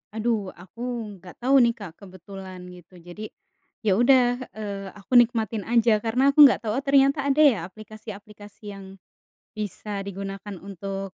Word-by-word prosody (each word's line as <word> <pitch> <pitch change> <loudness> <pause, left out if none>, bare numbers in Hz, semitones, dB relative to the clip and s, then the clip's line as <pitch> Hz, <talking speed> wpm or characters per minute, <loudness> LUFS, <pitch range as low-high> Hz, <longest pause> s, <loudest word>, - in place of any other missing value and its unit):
Aduh, 225 0 0 0.2
aku 185 +5 -17 0.4
nggak 180 0 -13
tahu 265 +2 +3
nih 235 0 +3
Kak, 200 -5 -8
kebetulan 190 0 -11 0.2
gitu 180 +1 -18
jadi, 175 +4 -10 0.6
ya 210 - +3
udah, 255 +1 +5 0.3
eee, 200 -2 -5
aku 200 - -21
nikmatin 225 -3 +1
aja 235 -1 +4
karena 230 +3 0
aku 280 - -2
nggak 260 - +1
tahu 215 - -2
oh 275 - -9
ternyata 275 +1 +4
ada 280 +2 +3
ya - - -5
aplikasi-aplikasi 210 0 -12
yang, 195 -1 -10 0.7
bisa 210 0 -5 0.2
digunakan 195 +1 -7
untuk, 195 0 -5
210 Hz, 150 wpm, -24 LUFS, 195-235 Hz, 0.7 s, udah